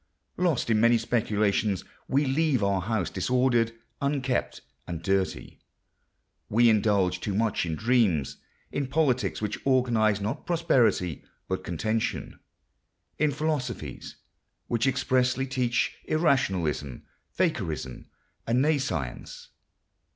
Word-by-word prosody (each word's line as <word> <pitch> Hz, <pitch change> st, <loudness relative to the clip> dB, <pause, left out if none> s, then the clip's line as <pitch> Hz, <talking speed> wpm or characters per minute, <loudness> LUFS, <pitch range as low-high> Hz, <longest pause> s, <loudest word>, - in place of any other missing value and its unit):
Lost 165 Hz, -10 st, +1 dB
in 110 Hz, -, +3 dB
many 115 Hz, +1 st, +5 dB
speculations, 105 Hz, -4 st, 0 dB, 0.2 s
we 140 Hz, +2 st, +2 dB
leave 135 Hz, -3 st, +1 dB
our 100 Hz, -1 st, +1 dB
house 100 Hz, -2 st, -1 dB
disordered, 120 Hz, +4 st, +1 dB, 0.3 s
unkept, 140 Hz, -3 st, -1 dB, 0.3 s
and 85 Hz, -2 st, -5 dB
dirty. 95 Hz, +1 st, -1 dB, 0.9 s
We 115 Hz, +2 st, +5 dB
indulge 100 Hz, -4 st, +2 dB
too 100 Hz, 0 st, -3 dB
much 110 Hz, -4 st, 0 dB
in 80 Hz, -, -2 dB
dreams; 110 Hz, -, +1 dB, 0.3 s
in 140 Hz, -1 st, -2 dB
politics 130 Hz, -, 0 dB
which 105 Hz, 0 st, -2 dB
organise 120 Hz, -6 st, +2 dB
not 105 Hz, +3 st, -4 dB
prosperity 120 Hz, -, +2 dB, 0.2 s
but 95 Hz, 0 st, -3 dB
contention; 110 Hz, +6 st, -2 dB, 0.8 s
in 155 Hz, 0 st, +3 dB
philosophies 135 Hz, -, -3 dB, 0.5 s
which 120 Hz, +2 st, 0 dB
expressly 130 Hz, 0 st, +1 dB
teach 125 Hz, -2 st, 0 dB
irrationalism, 95 Hz, -, 0 dB, 0.3 s
fakirism, 65 Hz, -2 st, -2 dB, 0.4 s
and 120 Hz, +2 st, +2 dB
nescience. 135 Hz, -, -2 dB
115 Hz, 105 wpm, -27 LUFS, 95-130 Hz, 0.9 s, many